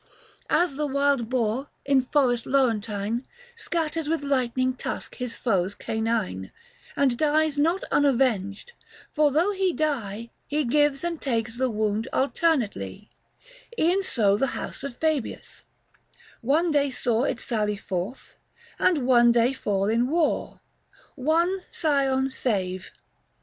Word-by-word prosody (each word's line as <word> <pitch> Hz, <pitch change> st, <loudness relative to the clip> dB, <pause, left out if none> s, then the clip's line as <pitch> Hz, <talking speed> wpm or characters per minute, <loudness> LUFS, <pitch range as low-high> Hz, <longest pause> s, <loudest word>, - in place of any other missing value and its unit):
235 -, -, +4 dB
As 270 Hz, -, -10 dB
the 300 Hz, 0 st, 0 dB
wild 280 Hz, -4 st, +1 dB
boar, 250 Hz, +2 st, -1 dB, 0.2 s
in 275 Hz, -1 st, +4 dB
forest 250 Hz, -3 st, +1 dB
Laurentine, 230 Hz, -3 st, 0 dB, 0.3 s
Scatters 325 Hz, -7 st, -2 dB
with 325 Hz, -2 st, 0 dB
lightning 255 Hz, -2 st, +1 dB
tusk 255 Hz, -, -5 dB
his 250 Hz, -2 st, -4 dB
foes 195 Hz, -4 st, 0 dB
canine, 220 Hz, -, -2 dB, 0.4 s
And 270 Hz, -3 st, +2 dB
dies 305 Hz, -1 st, +2 dB
not 335 Hz, +6 st, +2 dB
unavenged, 255 Hz, -, +1 dB, 0.4 s
for 300 Hz, -1 st, +4 dB
though 335 Hz, +8 st, +2 dB
he 380 Hz, -2 st, +1 dB
die, 235 Hz, -, -2 dB, 0.2 s
He 300 Hz, +1 st, 0 dB
gives 290 Hz, +2 st, +2 dB
and 340 Hz, -2 st, -3 dB
takes 230 Hz, -3 st, -1 dB
the 260 Hz, +1 st, 0 dB
wound 215 Hz, +1 st, -1 dB
alternately, 235 Hz, -, -1 dB, 0.7 s
E'en 360 Hz, +2 st, +3 dB
so 205 Hz, -, +2 dB
the 270 Hz, -, +1 dB
House -, -, -6 dB
of 280 Hz, -3 st, -5 dB
Fabius; 315 Hz, -6 st, -2 dB, 0.8 s
one 310 Hz, +8 st, +2 dB
day 285 Hz, -1 st, +2 dB
saw 245 Hz, -1 st, 0 dB
240 -, -, +1 dB
It -, -, -13 dB
sally 210 Hz, -3 st, -1 dB
forth, 195 Hz, +5 st, -5 dB, 0.4 s
and 300 Hz, -8 st, +2 dB
one 240 Hz, -2 st, +6 dB
day 235 Hz, +2 st, +3 dB
fall 200 Hz, -6 st, -1 dB
in 230 Hz, +3 st, +2 dB
war. 320 Hz, +2 st, 0 dB, 0.5 s
One 330 Hz, +7 st, +1 dB
scion 270 Hz, -4 st, +1 dB
save. 190 Hz, -8 st, -2 dB
260 Hz, 135 wpm, -25 LUFS, 225-295 Hz, 0.8 s, one